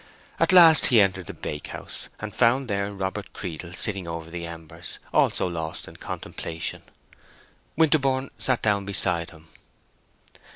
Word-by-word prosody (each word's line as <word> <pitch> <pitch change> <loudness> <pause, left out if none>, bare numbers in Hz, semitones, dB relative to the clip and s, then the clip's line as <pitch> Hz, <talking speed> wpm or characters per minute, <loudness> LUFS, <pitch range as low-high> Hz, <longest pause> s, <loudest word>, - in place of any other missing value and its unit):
At - - +3
last 170 -4 +8
he 120 - +6
entered 95 -3 +2
the - - -6
bakehouse, 75 -1 -6
and 105 -1 -6
found 125 +3 +3
there 100 -1 -1
Robert 100 +1 -4
Creedle 85 -1 -6
sitting 100 -5 -2
over 85 0 -6
the 85 -1 -5
embers, 80 -1 -9 0.2
also - - +3
lost 80 -2 -4
in - - -12
contemplation. 80 -1 -5 1.0
Winterborne 140 -4 +2
sat 130 -2 0
down 100 -2 +2
beside 85 -4 0
him. 80 0 -16
100 Hz, 135 wpm, -25 LUFS, 85-120 Hz, 1.0 s, last